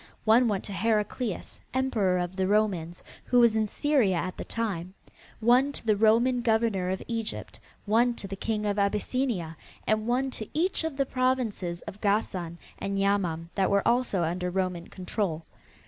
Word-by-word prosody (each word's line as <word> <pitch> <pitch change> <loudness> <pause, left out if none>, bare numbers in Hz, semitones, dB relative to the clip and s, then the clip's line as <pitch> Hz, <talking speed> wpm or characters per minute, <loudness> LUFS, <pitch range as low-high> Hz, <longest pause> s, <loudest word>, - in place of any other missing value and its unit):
One 230 +3 +5
went 205 -3 -1
to 200 - -6
Heraclius, 215 +1 -1 0.2
Emperor 220 -9 +1
of 180 +1 -3
the 190 -1 0
Romans, 190 -5 0 0.2
who 245 - +3
was 235 -2 +5
in 215 -1 +2
Syria 255 -6 +2
at 185 +2 -2
the - - -5
time; 190 -5 -3 0.4
one 250 +5 +4
to - - -9
the 215 -2 +3
Roman 230 +4 +3
Governor 220 -5 +1
of 190 0 -2
Egypt, 225 -2 -4 0.3
one 235 +3 +3
to 200 - -7
the 195 - -5
King 210 +1 -2
of 205 0 0
Abyssinia 200 -3 0 0.3
and 215 +1 +1
one 260 +2 +1
to 215 -4 -6
each 345 +2 +1
of 320 -4 -3
the 275 - +2
provinces 250 -10 -1
of 205 - -9
Gassan 190 -5 0 0.2
and 195 0 -2
Yamam 180 -5 0
that 190 -1 +1
were 200 0 +2
also 235 -7 +2
under 180 +2 -1
Roman 180 -2 -2
control. 180 -3 -3
210 Hz, 170 wpm, -28 LUFS, 185-235 Hz, 0.4 s, One